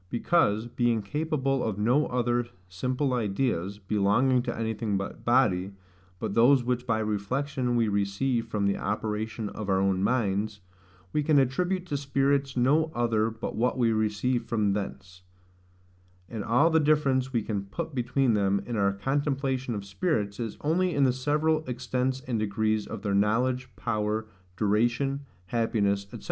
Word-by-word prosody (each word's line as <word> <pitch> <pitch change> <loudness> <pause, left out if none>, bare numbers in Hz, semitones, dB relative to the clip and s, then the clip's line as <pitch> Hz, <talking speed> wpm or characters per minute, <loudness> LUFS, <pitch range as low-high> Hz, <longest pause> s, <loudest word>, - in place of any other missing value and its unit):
Because, 115 - +2
being 120 -2 0
capable 140 +1 -1
of 110 -3 -2
no 120 +8 +2
other 120 -1 0 0.2
simple 125 +9 -1
ideas, 100 -4 -1
belonging 105 +6 +2
to - - -4
anything 110 -2 -1
but 100 - -6
body, 100 -7 +2 0.4
but 95 - -3
those 125 +4 +5
which 125 0 -2
by 115 -2 +2
reflection 120 +5 -1
we 115 -2 +2
receive 105 +4 0
from 105 -3 -1
the 100 - +1
operation 105 +1 -3
of 105 -1 -6
our 95 -1 +3
own 95 -1 +1
minds, 105 -3 0 0.5
we 150 - +2
can 150 0 +3
attribute 175 +8 +1
to 145 -5 -2
spirits 140 -1 0
no 150 +6 +3
other 115 -2 +1
but 110 0 -6
what 125 +3 +1
we 120 -2 +3
receive 110 +3 0
from 105 -4 +1
thence: 95 -2 -6 1.1
and 110 -3 -5
all 135 +10 +3
the 160 - +4
difference 140 -4 +2
we 115 -4 0
can 100 -3 -3
put 160 +10 -5
between 125 0 +1
them, 100 -1 +2
in 120 - -4
our 100 -2 +2
contemplation 135 +1 -1
of 100 -1 -5
spirits, 100 - -1
is 115 -3 -4
only 175 +3 +1
in 140 - +3
the 130 -2 +3
several 150 +4 +1
extents 130 +1 -2
and 125 -3 -2
degrees 110 0 0
of 100 - -7
their 100 -2 0
knowledge, 125 +6 +1
power, 105 0 -1 0.3
duration, 120 +7 +1 0.2
happiness, 100 -3 0
&c. - - -8
120 Hz, 155 wpm, -27 LUFS, 105-135 Hz, 1.1 s, those